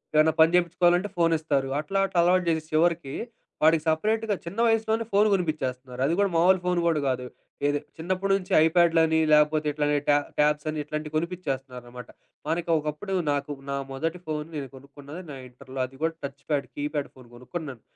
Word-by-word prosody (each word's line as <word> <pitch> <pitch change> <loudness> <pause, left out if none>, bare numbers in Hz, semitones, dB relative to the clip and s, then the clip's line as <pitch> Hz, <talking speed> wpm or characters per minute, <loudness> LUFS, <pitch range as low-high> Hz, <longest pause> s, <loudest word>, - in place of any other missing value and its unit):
ఏమైనా 155 +1 +5
పని 160 +1 +6
జేపించుకోవాలంటే 175 +2 +2
ఫోనిస్తారు. 155 -5 +1
అట్లా 155 +6 -3
అట్లా 180 - 0
అలవాటు 180 +1 +3
జేసి 160 -1 +1
చివరికి 160 -3 +1 0.5
వాడికి 160 0 +5
సెపరేట్‌గ 215 +7 +1
చిన్న 180 +6 -6
వయసులోనే 225 0 +1
ఫోను 205 +2 +4
కొనిపిచ్చేస్తున్నారు. 130 -8 -2
అది 160 - +1
కూడా 200 -1 +3
మామూలు 180 +3 +5
ఫోను 180 -1 +1
గూడా 165 -3 +2
కాదు. 125 -1 -2 0.4
ఏది 145 0 +1 0.2
చిన్నప్పటి 185 +4 -1
నుంచి 185 0 -10
ఐప్యాడ్‌లని 165 -1 +4
లాకపోతే 150 0 +4
ఇట్లనే 145 0 +1
ట్యా 145 - +5 0.2
ట్యాబ్స్ 150 0 +2
అని 155 0 -3
ఇట్లాంటివి 155 +1 -5
కొనిపిచ్చేస్తున్నారనమాట. 135 -8 -5 0.4
మనకి 165 +2 -2
ఒకప్పుడు 150 +6 -4 0.2
నాకు 145 0 -2 0.2
నా 140 - -1
మొదటి 165 +6 -3
ఫోను 150 -1 -3
నేను 140 -2 -4
కొనుక్కున్నది. 140 +4 -11
నా 135 - -7
ఇంటర్‌లో 130 +1 -10
అది 130 +1 -13
కూడా 165 0 +1
టచ్ 140 0 -7
ప్యాడ్, 145 -2 0
కీప్యాడ్ 145 0 -3
ఫోను 130 -2 -16
కొనుక్కున్నాను. 135 -1 -7
155 Hz, 165 wpm, -26 LUFS, 140-175 Hz, 0.5 s, పని